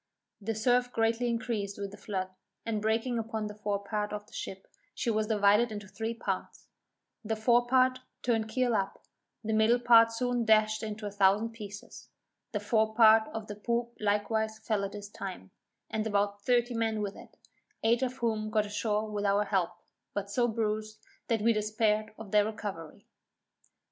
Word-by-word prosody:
The 225 +2 -2
surf 245 +3 +2
greatly 230 +1 +1
increasing 220 -4 -2
with 200 - -5
the - - -9
flood, 190 -2 -3 0.4
and 220 -2 -1
breaking 225 +3 0
upon 220 -1 -3
the 210 - -5
fore 205 -1 -3
part 210 0 -2
of 210 0 -5
the 235 - -22
ship, 190 -2 -6 0.3
she 235 - 0
was 215 -1 0
divided 210 +2 +4
into 205 -2 -6
three 225 +3 -4
parts; 230 - -4 0.6
the 220 +1 -1
fore 240 +2 +3
part 255 0 +3 0.2
turned 225 -3 +1
keel 245 +1 +1
up, 195 -1 -2 0.4
the 220 0 -1
middle 220 +2 +4
part 230 -2 +6
soon 245 +1 0
dashed 215 0 +3
into 215 -1 -5
a 205 - -3
thousand 200 +3 +3
pieces; 205 -3 -10 0.4
the 210 - -1
fore 220 +1 +1
part 220 -1 +7
of 220 -1 -6
the 210 - -6
poop 235 +2 -2
likewise 220 +1 0
fell 215 -2 -1
at 195 - -4
this 205 -1 -7
time, 190 - -8 0.4
and 220 0 -2
about 205 -1 0
thirty 245 +2 +2
men 225 -2 0
with 200 -1 -4
it, - - -14 0.5
eight 230 +2 +3
of 260 0 -1
whom 220 -3 -1
got 215 -1 +2
ashore 210 +1 -1
with 210 -1 -3
our 200 +1 +3
help, 190 -4 +1 0.5
but 200 0 -3
so 240 +3 +2
bruised, 215 -1 -2 0.3
that 225 -3 0
we 230 +1 +5
despaired 215 0 0
of 215 -3 -9
their 210 -1 +5
recovery. 205 -7 -6
215 Hz, 180 wpm, -30 LUFS, 205-230 Hz, 0.6 s, part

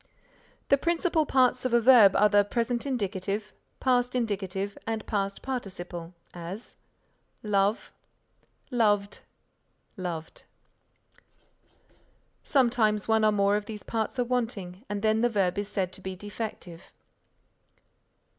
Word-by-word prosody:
The 280 - +5
principal 335 -1 +1
parts 255 -1 +3
of 255 -2 +1
a - - +6
verb 230 -5 +7
are 210 - +6
the 205 0 +4
Present 235 +4 -1
Indicative, 205 -3 -3 0.3
Past 250 -1 +1
Indicative 200 -4 -2
and 225 -1 -3
Past 200 -2 -2
Participle; 185 -9 -5 0.2
as: 180 +6 -7 0.7
Love 205 +1 0 0.8
Loved 205 -4 +1 0.8
Loved 170 -4 -5 2.0
Sometimes 230 -6 +2
one 220 -1 +3
or 215 - +5
more 200 0 +2
of 210 0 -2
these 210 -1 -7
parts 225 +2 -3
are 250 - +2
wanting, 225 -6 -3
and 205 0 -3
then 220 0 +3
the 240 - +3
verb 200 -3 0
is 205 - -3
said 190 -3 -2
to 190 - -11
be 190 0 -5
defective. 200 -3 -7
210 Hz, 120 wpm, -27 LUFS, 195-240 Hz, 2.0 s, verb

